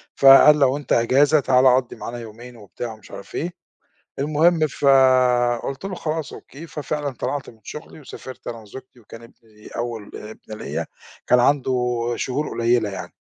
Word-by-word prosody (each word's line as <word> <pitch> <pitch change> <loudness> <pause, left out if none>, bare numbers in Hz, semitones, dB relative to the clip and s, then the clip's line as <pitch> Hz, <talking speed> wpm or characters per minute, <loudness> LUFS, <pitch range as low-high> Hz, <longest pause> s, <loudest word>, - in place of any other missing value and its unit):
فقال: 140 +2 +7
"لو 135 -1 +3
أنت 145 - -2
إجازة 140 +6 +3
تعال 130 -1 +3
قضّي 130 -2 -2
معانا 120 0 -7
يومين،" 120 +2 -11
وبتاع 115 +2 -7
ومش 110 -2 -17
عارف - - -10
إيه. 170 +3 -3 0.7
المهم 155 +3 +2
فقُلت 130 0 +2
له: 195 -1 -4
"خلاص 155 -3 -4
أوكي." 155 +5 -11
ففعلًا 150 -1 -4
طلعت 140 +2 -4
من 115 - -18
شُغلي 150 +1 -10
وسافرت 130 -2 -11
أنا 115 - -5
وزوجتي 125 +4 -13
وكان 115 0 -13
ابني 110 -2 -18
أول 115 -3 -6
ابن 110 0 -10
ليّا، 80 -3 -4 0.4
كان 125 - +5
عنده 135 +1 +2 0.4
شهور 140 +4 -3
قليّلة 115 -2 +1
يعني. 95 - -8
130 Hz, 155 wpm, -22 LUFS, 115-145 Hz, 0.7 s, فقال